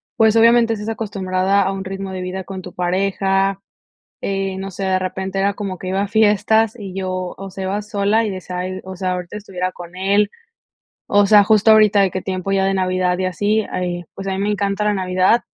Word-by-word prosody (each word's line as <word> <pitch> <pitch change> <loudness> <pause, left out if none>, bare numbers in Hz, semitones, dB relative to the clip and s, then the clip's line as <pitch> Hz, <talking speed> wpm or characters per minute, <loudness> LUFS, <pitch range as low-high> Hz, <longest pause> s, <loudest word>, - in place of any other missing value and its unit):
pues, 220 -1 +4
obviamente, 230 0 +5
estás 210 0 -5
acostumbrada 195 -3 0
a 195 - 0
un 195 0 -5
ritmo 195 0 -5
de 185 -1 -5
vida 185 +1 -4
con 190 0 -7
tu - - -10
pareja. 195 +1 0 0.6
Eh, 195 -1 -2
no 195 0 -5
sé, 195 - -6
de 190 -1 +1
repente 190 +1 -3
era 200 +1 +2
como 195 -2 -5
que 185 - -6
iba 190 +1 0
a 200 - -1
fiestas, 220 +1 +3
y 195 -3 -7
yo, 185 -1 -3
o 195 0 -7
sea, 190 0 -5
iba 200 +2 -1
sola, 210 +2 +1
y - - -1
decía: 185 -1 -6
"Ay, 185 +1 -4
o 190 0 -8
sea, 185 0 -2
ahorita 180 +2 -5
estuviera 185 -3 -4
con 175 -1 -11
él". 200 +2 +2 0.8
O 205 0 +4
sea, 205 0 +7
justo 215 +1 +4
ahorita, 215 -2 +6
de 195 -1 +3
qué 185 - -4
tiempo 185 0 -3
ya 195 -1 +2
de 195 0 +1
Navidad, 185 -1 0
y 185 - 0
así. 205 +4 0
Ay, 175 -1 -3
pues, 195 - -7
a 195 - -1
mí 190 - -3
me 200 +2 0
encanta 200 0 -1
la 210 0 +2
Navidad. 185 +4 +2
195 Hz, 225 wpm, -19 LUFS, 185-205 Hz, 0.8 s, sea